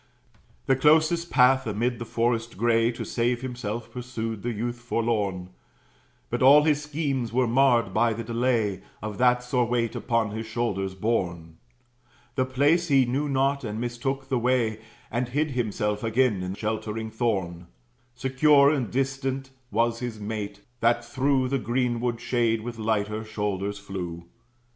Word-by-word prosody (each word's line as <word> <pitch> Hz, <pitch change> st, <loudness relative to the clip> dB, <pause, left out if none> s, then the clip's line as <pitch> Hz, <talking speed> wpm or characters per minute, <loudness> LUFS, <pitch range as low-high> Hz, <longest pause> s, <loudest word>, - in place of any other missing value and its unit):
The 135 Hz, -, +3 dB
closest 160 Hz, +4 st, +3 dB
path, 130 Hz, 0 st, +4 dB
amid 115 Hz, +3 st, -1 dB
the 120 Hz, -, -5 dB
forest 115 Hz, -1 st, -1 dB
gray, 115 Hz, +1 st, +3 dB
To -, -, -5 dB
save 120 Hz, +1 st, -1 dB
himself, 120 Hz, -3 st, -5 dB
pursued 115 Hz, -4 st, -5 dB
the 120 Hz, -, -2 dB
youth 120 Hz, +2 st, -3 dB
forlorn; 105 Hz, -6 st, -1 dB, 0.8 s
But -, -, -1 dB
all 140 Hz, +3 st, +8 dB
his 150 Hz, -1 st, +2 dB
schemes 145 Hz, -6 st, -2 dB
were 125 Hz, +2 st, +2 dB
marred 120 Hz, -4 st, +3 dB
by 115 Hz, +2 st, +3 dB
the 115 Hz, +2 st, -5 dB
delay 115 Hz, -4 st, 0 dB, 0.2 s
Of 105 Hz, -2 st, -5 dB
that 125 Hz, 0 st, +4 dB
sore 125 Hz, 0 st, +1 dB
weight 115 Hz, -1 st, -1 dB
upon 115 Hz, -3 st, 0 dB
his 110 Hz, +1 st, -5 dB
shoulders 100 Hz, -5 st, -2 dB
borne. 85 Hz, -6 st, -2 dB, 0.8 s
The 130 Hz, 0 st, +1 dB
place 145 Hz, +7 st, +2 dB
he 135 Hz, -4 st, +4 dB
knew 140 Hz, +5 st, -1 dB
not, 135 Hz, +1 st, +1 dB
and 110 Hz, -1 st, -4 dB
mistook 130 Hz, +3 st, -3 dB
the 130 Hz, -2 st, 0 dB
way, 120 Hz, -3 st, +1 dB, 0.3 s
And 120 Hz, +2 st, -1 dB
hid 150 Hz, +4 st, 0 dB
himself 105 Hz, -3 st, -1 dB
again 115 Hz, -3 st, +2 dB
in 90 Hz, +1 st, -4 dB
sheltering 110 Hz, +1 st, -3 dB
thorn. 95 Hz, -7 st, -2 dB, 0.5 s
Secure 140 Hz, +2 st, +4 dB
and 130 Hz, -8 st, -1 dB
distant 135 Hz, 0 st, -2 dB, 0.2 s
was 115 Hz, +1 st, +1 dB
his 120 Hz, -3 st, -5 dB
mate, 105 Hz, -1 st, -5 dB, 0.2 s
that 120 Hz, +1 st, +2 dB
through 130 Hz, +1 st, +1 dB
The 135 Hz, 0 st, 0 dB
greenwood 120 Hz, 0 st, -1 dB
shade 120 Hz, -2 st, +1 dB
with 115 Hz, 0 st, -7 dB
lighter 110 Hz, 0 st, -1 dB
shoulders 105 Hz, -2 st, -3 dB
flew. 90 Hz, -4 st, -6 dB
120 Hz, 150 wpm, -26 LUFS, 110-130 Hz, 0.8 s, all